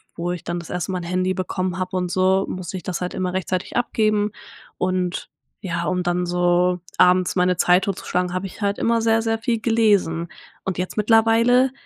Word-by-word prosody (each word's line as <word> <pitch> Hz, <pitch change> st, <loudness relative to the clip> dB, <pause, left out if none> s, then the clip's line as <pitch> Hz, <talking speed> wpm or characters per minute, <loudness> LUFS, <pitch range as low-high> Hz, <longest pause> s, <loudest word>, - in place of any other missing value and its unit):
wo 175 Hz, +1 st, -2 dB
ich 180 Hz, -, -5 dB
dann 175 Hz, +1 st, -2 dB
das 170 Hz, -, -10 dB
erste 180 Hz, +1 st, -3 dB
Mal 180 Hz, -, -1 dB
'n -, -, -8 dB
Handy 185 Hz, +2 st, 0 dB
bekommen 185 Hz, -1 st, -3 dB
habe 185 Hz, 0 st, -2 dB
und 180 Hz, -1 st, -1 dB
so, 190 Hz, +1 st, +2 dB
musste 185 Hz, 0 st, -5 dB
ich 180 Hz, -, -9 dB
das 185 Hz, -2 st, -4 dB
halt 180 Hz, -, -3 dB
immer 185 Hz, -1 st, -2 dB
rechtzeitig 185 Hz, 0 st, -3 dB
abgeben. 215 Hz, -3 st, +1 dB, 0.5 s
Und 185 Hz, -1 st, -1 dB, 0.3 s
ja, 175 Hz, -4 st, -3 dB
um 180 Hz, -1 st, 0 dB
dann 175 Hz, 0 st, 0 dB
so 180 Hz, 0 st, +2 dB, 0.2 s
abends 180 Hz, 0 st, +4 dB
meine 180 Hz, 0 st, +2 dB
Zeit 180 Hz, +2 st, +4 dB
tot 195 Hz, -2 st, -2 dB
zu -, -, -11 dB
schlagen, 180 Hz, 0 st, -1 dB
habe 185 Hz, +1 st, -2 dB
ich 190 Hz, -, -13 dB
halt 200 Hz, 0 st, 0 dB
immer 230 Hz, 0 st, +2 dB
sehr, 225 Hz, 0 st, +3 dB
sehr 225 Hz, 0 st, -1 dB
viel 230 Hz, 0 st, -1 dB
gelesen. 205 Hz, -8 st, +2 dB, 0.3 s
Und 190 Hz, -, -3 dB
jetzt 180 Hz, +1 st, -3 dB
mittlerweile 230 Hz, +4 st, +4 dB
185 Hz, 210 wpm, -22 LUFS, 180-210 Hz, 0.5 s, abends